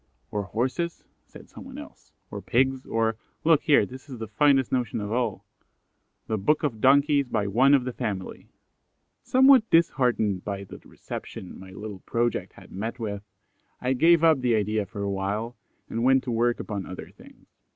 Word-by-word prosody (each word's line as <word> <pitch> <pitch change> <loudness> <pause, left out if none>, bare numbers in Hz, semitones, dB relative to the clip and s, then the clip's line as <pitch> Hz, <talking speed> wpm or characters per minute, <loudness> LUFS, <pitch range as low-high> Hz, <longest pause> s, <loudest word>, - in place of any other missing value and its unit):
"Or 105 - -1
Horses," 130 - -3 0.2
said - - -14
some - - -12
one - - -10
else; - - -12 0.2
"or - - -6
Pigs; 130 +1 0
or, 115 -1 0 0.3
look 160 -2 +4
here, 145 - +4
this 130 +3 -12
is 130 - -7
the 110 0 -6
finest 135 +4 +3
notion 125 -5 -1
of 105 0 -5
all: 115 -4 -2 0.8
'THE 110 -1 -2
BOOK 150 +12 +1
OF 115 -8 -2
DONKIES, 140 +1 +4
BY 105 - 0
ONE 130 +8 +4
OF 135 - +2
THE 125 0 -4
FAMILY!'" 105 -7 -5 0.7
Somewhat 260 -2 +5
disheartened 125 - +2
by 100 -1 -4
the 95 - -11
reception 95 - -9
my 95 0 -11
little 100 +1 -8
project 120 +2 -2
had - - -16
met 110 +5 -4
with, 105 -4 -4 0.6
I 125 +1 0
gave 165 +5 +4
up 160 -5 +5
the 120 -2 +2
idea 105 -1 0
for 100 +2 -6
awhile, 100 +4 -2 0.3
and 115 - -3
went 130 +1 +4
to 125 - -4
work 120 +1 +1
upon 100 -3 -5
other 95 - -8
things. - - -18
120 Hz, 175 wpm, -26 LUFS, 105-135 Hz, 0.8 s, Somewhat